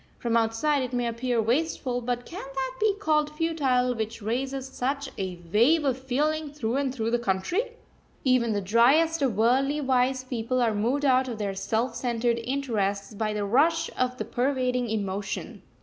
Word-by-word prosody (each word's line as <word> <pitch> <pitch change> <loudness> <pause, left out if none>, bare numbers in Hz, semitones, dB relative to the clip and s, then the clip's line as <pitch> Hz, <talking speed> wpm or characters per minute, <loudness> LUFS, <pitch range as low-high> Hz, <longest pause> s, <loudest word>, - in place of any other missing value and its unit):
From 235 -1 -1
outside 230 +6 +2
it 255 -1 -4
may 245 -1 0
appear 235 +1 -1
wasteful, 245 +1 0
but 245 0 -2
can 365 - -7
that 270 -1 -4
be 425 -2 +2
called 305 -7 +1
futile 285 -6 +1
which 225 -1 -4
raises 260 +5 -2
such 270 +2 -3
a 185 -2 -4
wave 290 +9 +4
of 265 -3 +2
feeling 290 +4 -1
through 255 -4 -2
and 275 -2 0
through 230 -3 -2
the 240 - +2
country? 240 - -1 0.5
Even 255 -3 +3
the 205 -1 0
driest 275 - +4
of 250 -7 +1
worldly 265 +6 +2
wise 260 -1 +1
people 255 0 -2
are 235 -3 +2
moved 245 +8 0
out 260 -1 +4
of 235 -3 -4
their 200 -2 -2
self 225 +5 -1
centred 235 -1 0
interests 230 -6 -2
by 215 +1 -1
the 210 -1 -2
rush 320 +9 +2
of 250 0 -1
the - - -3
pervading 250 -1 0
emotion. 200 -2 -3
250 Hz, 175 wpm, -26 LUFS, 225-275 Hz, 0.5 s, wave